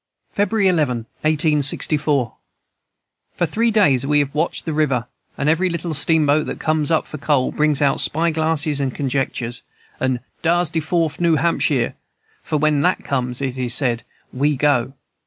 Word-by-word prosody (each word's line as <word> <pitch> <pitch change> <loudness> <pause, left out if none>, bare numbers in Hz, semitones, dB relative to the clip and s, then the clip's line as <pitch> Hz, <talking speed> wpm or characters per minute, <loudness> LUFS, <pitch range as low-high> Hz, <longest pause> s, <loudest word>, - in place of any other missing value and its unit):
"February 205 0 +1
11, 145 -10 +1 0.2
1864. 150 -3 +1 1.0
"For 175 - +1
three 225 +8 0
days 170 - +3
we 145 +2 +1
have 145 -1 0
watched 155 +3 -1
the 160 - -2
river, 140 -6 0 0.3
and 140 - -1
every 170 +4 +2
little 170 -1 -3
steamboat 150 0 +2
that - - -5
comes 155 -1 0
up 160 -1 +1
for 155 - -8
coal 140 -3 +1
brings 150 -2 +2
out 140 -1 +2
spy 165 +2 +1
glasses 155 -2 0
and 135 -2 -2
conjectures, 130 -3 -2 0.4
and 130 -1 0 0.2
'Dar's 170 0 +1
de 165 - 0
Fourf 160 -1 -1
New 170 -2 +3
Hampshire,' 150 -6 +1 0.5
for 155 - -2
when 150 -1 +2
that 180 +3 +1
comes, 125 -1 -2
it 130 -1 -3
is 125 -1 +1
said, 120 -4 +1 0.3
we 145 +3 +1
go. 135 -2 +1
150 Hz, 160 wpm, -20 LUFS, 135-160 Hz, 1.0 s, days